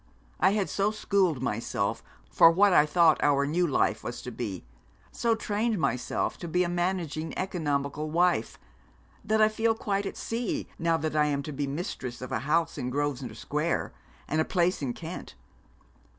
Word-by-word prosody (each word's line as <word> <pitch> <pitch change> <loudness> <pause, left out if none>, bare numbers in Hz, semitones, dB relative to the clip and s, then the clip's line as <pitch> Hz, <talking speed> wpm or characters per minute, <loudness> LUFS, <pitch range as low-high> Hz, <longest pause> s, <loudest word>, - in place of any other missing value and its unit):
I 190 +3 +4
had 205 -3 0
so 200 +1 +1
schooled 195 - +1
myself 105 -4 -1 0.3
for 165 - +7
what 195 +3 +4
I 150 -3 +6
thought 165 0 +4
our 140 -1 +3
new 170 +5 +1
life 110 -6 +1
was 120 - -6
to 125 - -6
be; 105 - -5 0.5
so 230 -1 +1
trained 220 +1 -1
myself 125 -7 -1
to 175 - -6
be 180 +2 +2
a 175 - -1
managing 175 -3 -2
economical 150 -4 -2
wife, 170 -7 +1 0.7
that 215 +1 +3
I - - +7
feel 225 +1 +1
quite 200 -2 -1
at - - -6
sea 230 0 -3
now 165 0 +2
that 155 0 -3
I 150 -1 +4
am 140 -1 -1
to 150 - -6
be 145 0 -2
mistress 135 - -5
of 125 - -7
a - - 0
house 165 0 +1
in 125 - -2
Grosvenor 140 -1 -2
Square 150 +3 -2 0.3
and 155 +1 +1
a - - +3
place 180 -1 +1
in 130 -4 -2
Kent. 165 - -8
165 Hz, 180 wpm, -28 LUFS, 140-190 Hz, 0.7 s, for